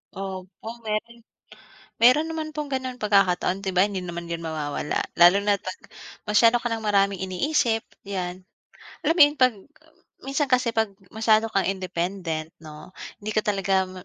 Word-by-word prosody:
Opo, 190 +1 -7 0.2
mayro'n 230 +2 -3 0.8
mayro'n 255 +7 +5
naman 315 -1 -4
pong 300 -2 -4
gano'ng 260 -1 -3
pagkakataon. 195 -2 +2
'Di 190 -2 -4
ba 180 - +6
hindi 200 -2 -2
naman 170 -1 -6
'yon 170 - -2
mawawala, 155 -3 -3 0.2
lalo 175 +3 +8
na 205 -1 +2
'pag 185 - -7 0.4
masyado 230 +3 +4
ka 240 0 -1
ng 225 - -1
maraming 200 -2 +2
iniisip, 225 - 0 0.2
'yan. 185 -1 -5 0.5
Alam 325 - +1
mo - - 0
'yon, 290 +1 0
'pag 255 -2 +5 0.7
minsan 275 +2 -1
kasi 255 -3 +1
'pag 220 -2 +1 0.2
masyado 220 +1 +2
kang 195 -3 0
independent, 180 -3 -3
'no, 155 +2 -12 0.2
hindi 215 +1 -5
ka 215 - +2
talaga 195 -2 0
mam 185 -1 -11
200 Hz, 160 wpm, -24 LUFS, 185-230 Hz, 0.8 s, lalo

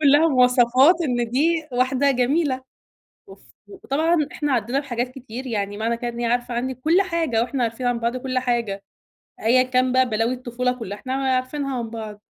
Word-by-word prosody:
كلّها 295 +3 +5
مواصفات 255 +3 +5
إن 240 -5 -1
دي 315 +4 +1
واحدة 260 +3 +2
جميلة، 260 +1 +1 0.6
وف 390 - -15 0.3
وطبعًا 330 -3 0 0.2
إحنا 295 -2 -2
عدينا 245 +3 0
بحاجات 245 -3 -3
كتير، 255 0 -9
يعني 205 -3 -3
معنى 230 +2 -1
كده 240 +1 -4
إن 235 0 -6
هي 235 - 0
عارفة 245 0 -1
عنّي 255 +2 -2
كُلّ 320 +10 +2
حاجة 325 -11 0
وإحنا 255 +1 -2
عارفين 230 +2 -2
عن 245 -1 +1
بعض 235 +2 -1
كُلّ 255 0 -2
حاجة، 235 -6 -2 0.6
أيًا 250 +3 +4
كان 255 0 +1
بقى 255 -2 +3
بلاوي 225 +3 0
الطفولة 250 0 -2
كلّها 205 -2 -6
إحنا 260 - -6
عارفينها 265 0 -1
عن 230 -2 -4
بعض. 215 -2 -7
255 Hz, 180 wpm, -22 LUFS, 235-275 Hz, 0.6 s, كلّها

